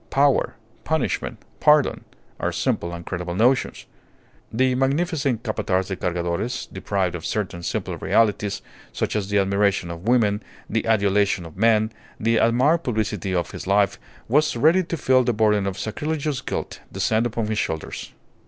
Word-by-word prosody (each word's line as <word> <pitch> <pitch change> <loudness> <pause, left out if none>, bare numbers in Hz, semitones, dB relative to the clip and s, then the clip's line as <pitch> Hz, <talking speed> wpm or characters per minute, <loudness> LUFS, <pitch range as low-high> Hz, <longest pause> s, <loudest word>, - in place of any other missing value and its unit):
Power, 140 0 +2 0.3
punishment, - - -1 0.2
pardon, 150 -1 +3 0.3
are - - 0
simple 85 - -1
and 85 0 -7
credible 90 -1 -4
notions. 125 +6 +2 0.7
The 130 +3 +2
magnificent 140 - 0
Capataz 95 -4 -1
de 95 - -2
Cargadores, 90 +8 -2
deprived 95 -3 -1
of 85 -2 -6
certain 95 -4 -3
simple - - -3
realities, 105 -2 +1 0.3
such - - -2
as 100 -2 -1
the 105 - +1
admiration 100 -2 +1
of 85 +5 -8
women, 110 -4 +3 0.3
the 115 0 -1
adulation 100 -4 +2
of 80 - -11
men, 110 +1 +3 0.3
the 115 +1 +2
admired 130 +10 +3
publicity 110 -5 -1
of 85 - -1
his - - -7
life, 100 -1 +2 0.3
was 150 +4 +2
ready 160 +10 +4
to 170 - -3
feel 130 -2 +3
the 120 -1 +1
burden 105 -2 +2
of 95 - -3
sacrilegious 150 +4 -2
guilt - - -4
descend 110 +3 +1
upon 115 -1 -2
his 110 0 -1
shoulders. 80 -1 -4
110 Hz, 155 wpm, -23 LUFS, 95-125 Hz, 0.7 s, ready